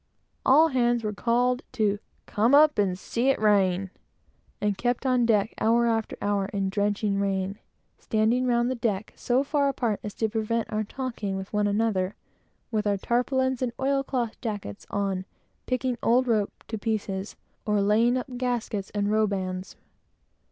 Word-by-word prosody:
All 310 +5 +6
hands 240 -3 +1
were 210 -1 -2
called 245 +3 +1
to 210 -4 +1 0.3
"come 230 +6 +3
up 300 -4 +5
and 190 -3 +1
see 235 +7 -1
it 270 - +2
rain," 195 -3 +2 0.7
and 205 -1 0
kept 245 +5 -1
on 250 -2 +3
deck 215 -1 +2
hour 235 +2 +3
after 225 -2 -1
hour 205 -1 0
in 200 -1 -2
a - - 0
drenching 205 0 0
rain, 195 0 -1 0.4
standing 225 +4 +1
round 240 0 +2
the - - +1
deck 220 -5 -2
so 255 +2 +1
far 280 -1 +1
apart 235 -6 -1
as 210 - -6
to 220 - 0
prevent 220 +1 -2
our 215 0 0
talking 220 -4 -4
with 190 +2 -7
one 210 0 +2
another, 205 -2 0 0.6
with 215 -2 0
our 200 -1 +2
tarpaulins 260 +4 0
and 245 -2 -1
oil 275 +1 +1
cloth 245 -4 -3
jackets 205 - -5
on, 195 -2 -1 0.4
picking 255 -1 -1
old 250 +2 +3
rope 215 -4 0
to 220 - -3
pieces, 205 -2 -3 0.3
or 210 -1 +2
laying 220 +5 +3
up 255 -1 -5
gaskets 240 -5 -2
and 205 0 0
robands. 195 -3 -1
220 Hz, 165 wpm, -26 LUFS, 200-245 Hz, 0.7 s, All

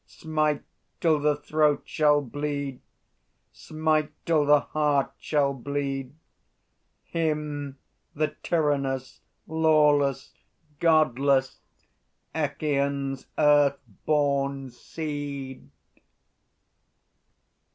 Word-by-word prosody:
Smite 155 -2 -1 0.4
till 160 -3 +3
the 150 0 +2
throat 150 0 +1
shall 150 -1 +3
bleed, 140 0 -4 0.7
Smite 155 -1 -1 0.2
till 155 -3 +2
the 145 -1 +6
heart 145 -3 0
shall 140 -2 +1
bleed, 135 0 -4 0.9
Him 150 -4 -3 0.4
the 155 +1 +1
tyrannous, 140 -5 -1 0.2
lawless, 150 -4 +2 0.5
Godless, 140 -4 +2 0.7
Echîon's 140 -3 -1
earth 145 -2 +4 0.3
born 140 -3 0
seed! 140 - -6
145 Hz, 70 wpm, -26 LUFS, 140-155 Hz, 0.9 s, the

